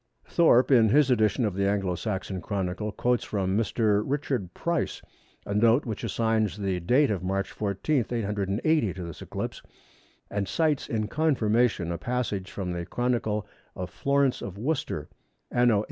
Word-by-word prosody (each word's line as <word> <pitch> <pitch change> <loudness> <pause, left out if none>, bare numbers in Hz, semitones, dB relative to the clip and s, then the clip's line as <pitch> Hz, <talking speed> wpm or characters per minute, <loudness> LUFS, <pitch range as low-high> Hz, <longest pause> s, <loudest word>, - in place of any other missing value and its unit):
Thorpe 130 -7 +4
in 115 -4 +6
his 140 +3 +4
edition 110 0 +2
of 105 - -1
the 100 +1 0
Anglo 100 -2 0
Saxon 95 0 -3
Chronicle 100 +1 -2
quotes 125 +3 0
from 95 -2 -1
Mr. 105 -1 +2
Richard 135 -9 -2
Price 170 -3 -1 0.5
a 100 - -3
note 115 +6 +4
which 110 -4 -4
assigns 110 -3 0
the 95 -3 -1
date 125 - +3
of 100 - -1
March 95 +1 -2
14, 110 +6 0
880, 105 - 0
to 95 - -6
this 85 -2 -8
eclipse, - - -5 0.7
and 100 -1 -1
cites 155 -4 +1
in 110 -2 -1
confirmation 120 - +1
a 85 - -3
passage 110 -5 -2
from 95 -3 -4
the 85 -1 -3
Chronicle 115 -4 -1 0.3
of 90 0 -5
Florence 140 -1 +1
of 100 -1 -6
Worcester, 135 - -2 0.4
anno 120 -2 +4
879. - - +3
110 Hz, 160 wpm, -27 LUFS, 100-125 Hz, 0.7 s, in